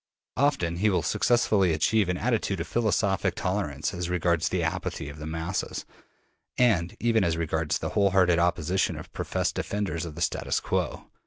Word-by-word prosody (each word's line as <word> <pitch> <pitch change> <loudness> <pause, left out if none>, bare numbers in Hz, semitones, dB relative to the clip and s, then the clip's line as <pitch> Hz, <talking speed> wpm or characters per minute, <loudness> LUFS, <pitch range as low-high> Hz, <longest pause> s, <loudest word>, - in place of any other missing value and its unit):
Often 130 - +1
he 105 +4 +3
will 95 - +1
successfully 105 -7 +2
achieve 100 +5 +2
an 90 - 0
attitude 110 -5 0
of 85 - -2
philosophic 105 -4 +1
tolerance 90 -7 -2
as 90 -1 -3
regards 85 -2 +1
the 90 -2 0
apathy 80 -3 -3
of 70 +1 -10
the 75 - -6
masses, 80 +3 -3 0.7
and 100 -9 +2
even 115 -3 +2
as 85 -3 +1
regards 80 -1 0
the - - -4
whole 100 -1 +3
hearted 90 -3 +4
opposition 90 +1 +1
of - - -10
professed - - -1
defenders 100 -6 -2
of 80 -3 -6
the 85 - -7
status - - 0
quo. - - -2
90 Hz, 170 wpm, -27 LUFS, 85-105 Hz, 0.7 s, hearted